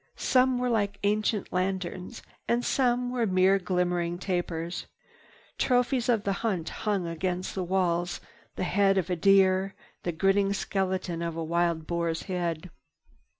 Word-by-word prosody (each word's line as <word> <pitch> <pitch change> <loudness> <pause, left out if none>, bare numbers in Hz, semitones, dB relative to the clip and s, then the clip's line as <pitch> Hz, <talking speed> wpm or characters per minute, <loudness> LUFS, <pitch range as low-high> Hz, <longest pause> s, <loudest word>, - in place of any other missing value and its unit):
Some 255 0 +3
were 250 0 0
like 205 -3 0
ancient 210 0 0
lanterns, 185 +2 -3 0.2
and 240 +1 +1
some 245 -1 +1
were 240 -3 0
mere 190 +1 +4
glimmering 180 -2 0
tapers. 175 -2 -3 0.7
Trophies 250 0 +2
of 225 -4 +2
the 200 - 0
hunt 190 -8 -1
hung 205 -4 -2
against 180 +2 -3
the 190 - -2
walls—the 175 0 -2
head 195 +2 +3
of 185 -1 0
a - - +2
deer, 195 +1 +3 0.3
the 175 - -2
grinning 195 +4 +2
skeleton 190 -4 -2
of 170 -1 -3
a 165 - -3
wild 170 0 0
boar's 170 -1 -2
head. 175 -2 -3
185 Hz, 140 wpm, -28 LUFS, 175-205 Hz, 0.7 s, mere